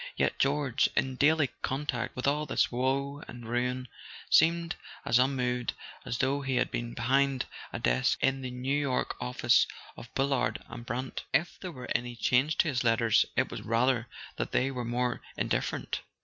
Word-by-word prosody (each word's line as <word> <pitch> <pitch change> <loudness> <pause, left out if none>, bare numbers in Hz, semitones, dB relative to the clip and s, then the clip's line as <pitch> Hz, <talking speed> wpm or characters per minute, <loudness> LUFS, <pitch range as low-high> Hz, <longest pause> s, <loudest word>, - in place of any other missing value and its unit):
Yet - - 0
George, 140 -2 +2
in 130 -1 +1
daily 150 -1 +4
contact 130 -3 -2
with 125 - -3
all 150 +2 +1
this - - +2
woe 135 +3 -1
and 120 -2 -9
ruin, 125 +2 -1 0.4
seemed 170 +1 +4 0.3
as 120 - +4
un¬ 130 +1 +4
moved 125 -2 -1 0.3
as 115 - -2
though 135 +3 +1
he 135 -1 -1
had 125 0 +1
been 120 0 -3
behind 135 +2 +2 0.3
a - - -3
desk - - +2
in 135 0 +1
the 130 - -4
New 125 +3 -1
York 140 -3 0
office 125 0 +3 0.3
of 115 - -11
Bullard 135 -1 +1
and 115 0 -8
Brant. 125 +3 -3
If 175 - +1
there 185 - -6
were 125 -5 -8
any 120 0 -1
change 130 +6 +2
in - - +1
his 125 -4 0
letters 115 -1 +4
it - - +1
was - - -5
rather 120 +1 +1 0.3
that - - -3
they 135 +2 +2
were 125 -2 -4
more 120 +1 -1 0.2
indifferent. - - -1
130 Hz, 175 wpm, -30 LUFS, 120-140 Hz, 0.4 s, daily